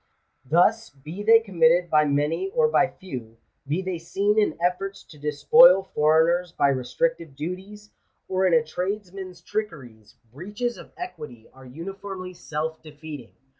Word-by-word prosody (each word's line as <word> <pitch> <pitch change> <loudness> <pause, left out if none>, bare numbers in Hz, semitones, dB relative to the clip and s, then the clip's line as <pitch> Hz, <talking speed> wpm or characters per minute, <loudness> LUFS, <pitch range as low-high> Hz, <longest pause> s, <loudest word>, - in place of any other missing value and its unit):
Thus, 215 +8 +3
be 155 +8 -9
they 225 +2 +6
committed 175 -4 +2
by 150 0 +4
many 150 - 0
or 480 -1 +4
by 180 - +3
few 125 -12 -9
— - - -38
be 160 +7 -1
they 185 -2 -3
seen 200 +5 0
in 205 -7 +1
efforts 180 +3 -2
to 150 - -16
despoil 180 - +6
foreigners 160 +3 +3
by 140 -4 +2
restrictive, 150 - -2
duties, 190 +7 -7 0.4
or 190 0 +1
in 180 - +2
a 160 - +4
tradesman's 185 +1 -5
trickeries 125 - -6
— 115 -1 -35
breaches 205 - -4
of - - -13
equity 150 - -9
are 130 0 -15
uniformly 185 +5 -7
self 160 -1 -5
defeating. 150 -4 -10
175 Hz, 150 wpm, -24 LUFS, 150-195 Hz, 0.4 s, they